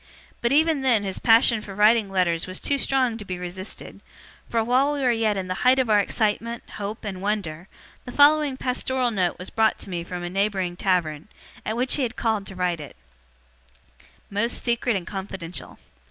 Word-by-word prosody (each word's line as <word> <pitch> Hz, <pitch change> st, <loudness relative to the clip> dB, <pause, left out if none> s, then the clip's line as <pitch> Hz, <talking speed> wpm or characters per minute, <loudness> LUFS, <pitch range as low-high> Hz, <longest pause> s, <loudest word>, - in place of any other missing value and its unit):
But 235 Hz, -, +1 dB
even 310 Hz, 0 st, +3 dB
then 240 Hz, -6 st, +3 dB
his 195 Hz, -1 st, -3 dB
passion 230 Hz, -1 st, +5 dB
for 200 Hz, -2 st, -9 dB
writing 210 Hz, 0 st, +4 dB
letters 180 Hz, -3 st, 0 dB
was 185 Hz, 0 st, -5 dB
too 280 Hz, -1 st, 0 dB
strong 255 Hz, -5 st, +1 dB
to -, -, -6 dB
be 185 Hz, -2 st, -5 dB
resisted; 180 Hz, +2 st, -7 dB, 0.5 s
for 230 Hz, -1 st, +1 dB
while 255 Hz, +5 st, +2 dB
we 285 Hz, -, -3 dB
were 255 Hz, -2 st, +3 dB
yet 220 Hz, -3 st, +1 dB
in 190 Hz, -1 st, -3 dB
the 185 Hz, -, -1 dB
height 255 Hz, +1 st, +5 dB
of 255 Hz, -4 st, +1 dB
our 210 Hz, -, +6 dB
excitement, 225 Hz, +3 st, -1 dB
hope, 210 Hz, +2 st, -5 dB
and 190 Hz, -3 st, -5 dB
wonder, 190 Hz, -5 st, -3 dB, 0.4 s
the 250 Hz, -, -7 dB
following 290 Hz, 0 st, +4 dB
pastoral 255 Hz, -1 st, -1 dB
note 185 Hz, -5 st, 0 dB
was 180 Hz, -, -9 dB
brought 220 Hz, -1 st, +2 dB
to 195 Hz, -, -11 dB
me 170 Hz, -1 st, -3 dB
from 175 Hz, 0 st, -6 dB
a 175 Hz, -, -3 dB
neighbouring 195 Hz, -2 st, 0 dB
tavern, 175 Hz, -4 st, 0 dB, 0.4 s
at 220 Hz, -, -3 dB
which 250 Hz, +3 st, +1 dB
he -, -, -1 dB
had 245 Hz, -2 st, -2 dB
called 220 Hz, -4 st, -1 dB
to 190 Hz, -, -10 dB
write 180 Hz, -2 st, -1 dB
it: 145 Hz, -, -9 dB, 1.4 s
'Most 210 Hz, +4 st, -1 dB
secret 235 Hz, -1 st, +1 dB
and 185 Hz, -3 st, -3 dB
confidential. 190 Hz, -3 st, -6 dB
210 Hz, 195 wpm, -24 LUFS, 185-245 Hz, 1.4 s, our